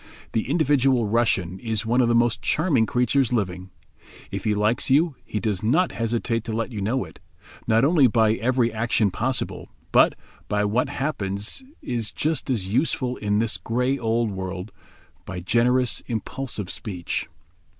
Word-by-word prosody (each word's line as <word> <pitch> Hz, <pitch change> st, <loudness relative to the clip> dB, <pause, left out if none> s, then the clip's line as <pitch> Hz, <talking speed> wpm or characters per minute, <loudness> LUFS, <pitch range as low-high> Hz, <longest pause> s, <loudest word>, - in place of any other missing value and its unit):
The 110 Hz, +2 st, -1 dB
individual 135 Hz, -6 st, +3 dB
Russian 100 Hz, -5 st, +1 dB
is 115 Hz, -2 st, -2 dB
one 120 Hz, +3 st, +3 dB
of 120 Hz, -, +3 dB
the 120 Hz, -, +2 dB
most 120 Hz, 0 st, +2 dB
charming 135 Hz, -11 st, +2 dB
creatures 125 Hz, +1 st, +1 dB
living. 95 Hz, -5 st, -2 dB, 0.6 s
If -, -, -5 dB
he 105 Hz, -1 st, +2 dB
like 105 Hz, +3 st, +1 dB
you 150 Hz, +3 st, +3 dB
he 105 Hz, -, -3 dB
does 100 Hz, -2 st, -1 dB
not 155 Hz, +12 st, +2 dB
hesitate 115 Hz, 0 st, -1 dB
to 115 Hz, -, -4 dB
let 115 Hz, +2 st, -2 dB
you 105 Hz, -3 st, -4 dB
know 125 Hz, +6 st, 0 dB
it; -, -, -15 dB, 0.5 s
not 115 Hz, +3 st, +4 dB
only 150 Hz, -3 st, +5 dB
by 110 Hz, -1 st, +3 dB
every 120 Hz, 0 st, +1 dB
action 110 Hz, -2 st, +1 dB
possible, 125 Hz, +7 st, -2 dB, 0.2 s
but, -, -, +5 dB, 0.3 s
by 105 Hz, 0 st, +1 dB
what 110 Hz, +5 st, +1 dB
perhaps 105 Hz, -, -3 dB, 0.2 s
is 115 Hz, -3 st, -2 dB
just 155 Hz, -1 st, -1 dB
as 100 Hz, -6 st, -1 dB
useful 130 Hz, -1 st, +1 dB
in 105 Hz, -1 st, 0 dB
this 110 Hz, 0 st, +1 dB
grey 125 Hz, +4 st, -1 dB
old 115 Hz, -1 st, 0 dB
world, 95 Hz, +1 st, -5 dB, 0.5 s
by 95 Hz, -2 st, -6 dB
generous, 120 Hz, +7 st, +2 dB
impulsive 115 Hz, -3 st, -4 dB
speech. 90 Hz, -7 st, -4 dB
115 Hz, 160 wpm, -24 LUFS, 105-125 Hz, 0.6 s, only